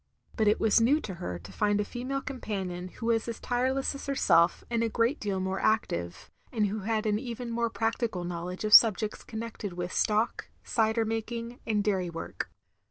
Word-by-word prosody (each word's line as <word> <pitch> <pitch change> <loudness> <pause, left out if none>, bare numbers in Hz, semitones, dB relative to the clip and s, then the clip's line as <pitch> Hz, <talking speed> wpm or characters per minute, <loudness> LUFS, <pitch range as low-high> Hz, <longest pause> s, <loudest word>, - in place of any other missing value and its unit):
But 220 -2 +2
it 210 - +4
was 220 0 +4
new 275 +7 +4
to 195 - -5
her 90 - -5
to 85 0 -12
find 205 -1 +1
a 210 - 0
female 255 +5 -3
com 275 -2 -6
panion 185 -3 -4
who - - -7
was 230 -1 +1
as 230 - -4
tireless 260 +3 0
as 275 - -8
herself 175 -11 +3
and 235 -1 0
a 230 - +1
great 235 +6 +1
deal 200 -2 -2
more 190 +1 -2
active, 85 - -1 0.2
and 220 -4 +1
who 205 +2 -2
had 215 +2 -1
an 210 -1 +1
even 240 0 -5
more 235 0 0
practical 225 -4 -1
knowledge 175 +2 -5
of 215 -1 0
subjects 215 -1 +6
connected 220 -4 -6
with 175 +1 -4
stock, 215 +2 +1 0.2
cider 225 0 +1
making, 230 +2 -4
and 210 -2 +1
dairy 190 -4 0
work. 165 -1 -5
220 Hz, 195 wpm, -29 LUFS, 190-235 Hz, 0.2 s, subjects